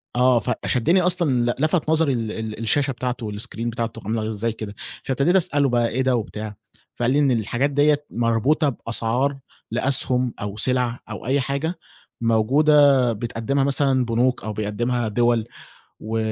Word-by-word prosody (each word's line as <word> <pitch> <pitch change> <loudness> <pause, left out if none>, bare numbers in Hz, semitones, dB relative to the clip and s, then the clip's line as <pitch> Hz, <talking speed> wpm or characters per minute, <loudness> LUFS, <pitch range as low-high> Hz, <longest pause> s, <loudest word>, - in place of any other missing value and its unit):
آه، 125 -1 +4
فشدّني 130 +8 +1
أصلًا 160 -10 +2
لَ - - -5
لفَت 155 0 +1
نظري 160 -3 +3
ال 115 -3 -3
ال 110 -1 -6
الشاشة 135 +5 +1
بتاعته 125 -2 -4
والسكرين 110 +2 -4
بتاعته 115 -1 -4
عامله 110 0 -2
إزاي 110 +2 -2
كده؟ 105 -2 -8 0.3
فابتديت 140 +7 +1
أسأله 145 -7 +2
بقى: 120 -1 +1
"إيه 130 - -1
ده؟" 130 -1 +2
وبتاع، 105 -2 -5 0.4
فقال 120 +1 0
لي 145 - +3
إن 140 -3 +3
الحاجات 120 +4 0
ديَّة 145 +1 +2
مربوطة 120 +7 +1
بأسعار 125 +3 -1 0.3
لأسْهُم 125 0 +2
أو 100 0 -4
سِلَع 125 0 +1
أو - - -7
أي 135 +3 +1
حاجة 140 +6 -3 0.4
موجودة 135 +3 +4
بتقدّمها 115 +4 -2
مثلًا 135 -2 +2
بنوك 120 +2 0
أو 110 - -4
بيقدّمها 110 +3 -2
دِوَل 120 +1 +1 0.5
و 110 +1 -4
125 Hz, 155 wpm, -22 LUFS, 115-140 Hz, 0.5 s, آه